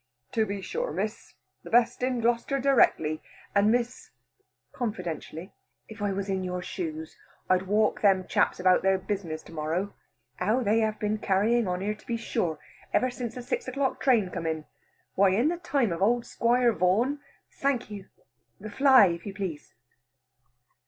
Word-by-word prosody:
"To 220 -2 +1
be 200 0 -4
sure, - - -3
Miss; - - -4 0.3
the - - -11
best 240 +1 +3
in 250 -1 0
Gloucester 240 +4 +1
directly. 195 - +3 0.3
And, 205 +1 +4
Miss" 245 +1 -1 0.6
confidentially, 180 -5 -5 0.3
"if 220 -1 -11
I 205 -1 0
was 195 0 -3
in 190 -1 -1
your 180 0 -3
shoes, 160 -4 -5 0.3
I'd 185 0 +2
walk 210 +2 +2
them 190 -3 +4
chaps - - +1
about 185 0 +4
their 190 0 +3
business 185 -5 -4
to - - -14
morrow. 165 +5 -2 0.4
How 215 +8 +1
they 220 +1 +3
have 215 -1 0
been 210 0 -1
carrying 215 +3 +2
on 180 0 -2
here, 210 +2 -1
to 215 - -18
be 235 - -1
sure, 175 -8 -2 0.3
ever 255 0 +2
since 245 -2 -5
the 250 - -6
six 250 +2 -3
o'clock 270 +1 -1
train 225 -9 +3
come 170 -3 -4
in. 160 -1 -3 0.5
Why, 190 -1 +4
in 245 +9 +3
the 345 - -2
time 275 - 0
of 170 - -3
the 195 - +3
old 240 +2 +1
Squire 240 0 +2
Vaughan 215 - +1 0.2
" - - -44
"Thank 265 -5 0
you, 200 -2 -8 0.5
the 210 +1 -8
fly, 265 -1 +7
if 170 +1 -3
you 195 - -6
please." 185 -7 -6
205 Hz, 180 wpm, -27 LUFS, 185-240 Hz, 0.6 s, fly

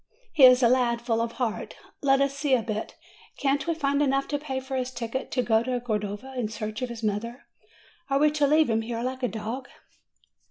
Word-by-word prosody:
He 285 -5 +8
is 255 0 +7
a - - +7
lad 240 -1 +2
full 230 -1 0
of 230 0 -2
heart. 240 -4 -3 0.3
Let 275 -1 +3
us 275 0 +1
see 280 -1 +2
a 235 - -1
bit. 215 -1 -4 0.4
Can't 275 +2 0
we 335 - +1
find 280 -2 0
enough 275 -1 +1
to 290 - -1
pay 270 -3 -3
for 265 0 -6
his 255 -1 -1
ticket 245 +1 -4
to 250 - 0
go 225 -2 +3
to 250 +1 -2
Cordova 215 +2 -4
in 245 -4 -1
search 215 +2 -5
of 250 - -2
his 230 -1 -8
mother? 225 +4 -3 0.6
Are 275 - +2
we 300 +1 +4
to 295 -1 +2
leave 305 -3 +4
him 225 0 +1
here 230 +1 -4
like 260 +1 -3
a 250 - +1
dog?" 230 +4 -5
250 Hz, 225 wpm, -26 LUFS, 230-275 Hz, 0.6 s, He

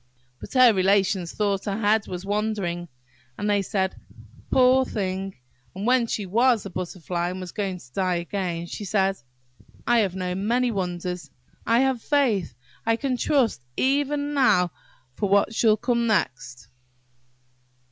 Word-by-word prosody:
But - - -10
her 250 -3 +7
relations 190 -2 +2
thought 200 -2 -1
her 200 -1 -2
head 210 0 +2
was 180 +1 -6
wandering, 200 -4 -2 0.5
and 205 - -2
they 205 -1 +2
said, 190 -1 -1 0.5
"Poor 260 0 +5
thing!" 190 -4 -3 0.4
And 195 +2 -4
when 245 -1 +3
she 210 -2 -2
was 230 +4 +2
a 195 - -6
Butterfly, 175 -1 -3
and 185 +1 -5
was 180 -2 -7
going 195 -3 -3
to 125 -7 -17
die 185 -2 0
again, 175 -1 -3
she 190 - -7
said– 195 -1 +1 0.7
"I 240 -1 +4
have 195 -4 0
known 185 +2 -3
many 245 +1 +2
wonders–I 180 - -3
have 265 -3 +1
faith–I 225 - -1
can 260 +2 -1
trust 250 - +1 0.2
even 285 +2 +1
now 180 - +3 0.4
for 200 +9 -2
what 200 +2 +3
shall 220 -1 +3
come 235 +1 0
next!" 130 - -1
200 Hz, 145 wpm, -24 LUFS, 180-235 Hz, 0.7 s, her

